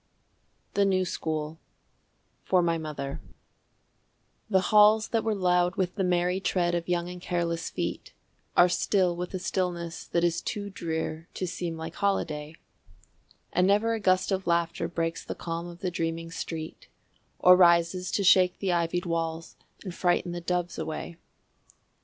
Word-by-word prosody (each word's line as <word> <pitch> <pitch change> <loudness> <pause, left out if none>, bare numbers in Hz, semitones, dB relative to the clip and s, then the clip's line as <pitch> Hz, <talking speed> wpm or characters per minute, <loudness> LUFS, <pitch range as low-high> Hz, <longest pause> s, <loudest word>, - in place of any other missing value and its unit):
The 200 - +3
New 190 -1 +2
School 155 -2 -3 0.8
(For 180 -2 +3
My 165 -1 +1
Mother) 140 -3 -5 1.3
The 190 -3 +2
halls 215 +1 +6
that 225 -2 0
were 220 -1 0
loud 180 -2 +2
with 185 -1 -1
the 195 - -1
merry 180 +1 +1
tread 175 -2 0
of 170 0 -2
young 175 -1 0
and 180 0 -8
careless 170 -2 -2
feet - - -4 0.5
Are 175 - +8
still 180 0 +1
with 180 +2 -5
a - - 0
stillness 175 -2 -3
that 170 - 0
is 170 -1 +1
too 205 -2 -4
drear 160 -2 -4
to 185 - -2
seem 170 -1 -4
like 160 +1 -6
holiday, 155 -6 -1 1.0
And 180 +1 +3
never 210 +3 +3
a 225 - -2
gust 185 -1 +2
of 190 -1 -1
laughter 170 -1 0
breaks 165 0 -3
the - - -6
calm 170 0 -5
of 175 0 -11
the 185 - -1
dreaming 165 0 -3
street 160 -1 -6 0.5
Or 180 0 +7
rises 175 0 +4
to 200 - +1
shake 185 -1 +5
the 195 -2 -1
ivied 175 +1 0
walls 165 -1 -3 0.3
and 185 -4 -6
frighten 175 0 +1
the 175 0 -5
doves 175 0 -2
away. 160 +1 -5
175 Hz, 160 wpm, -27 LUFS, 165-185 Hz, 1.3 s, Are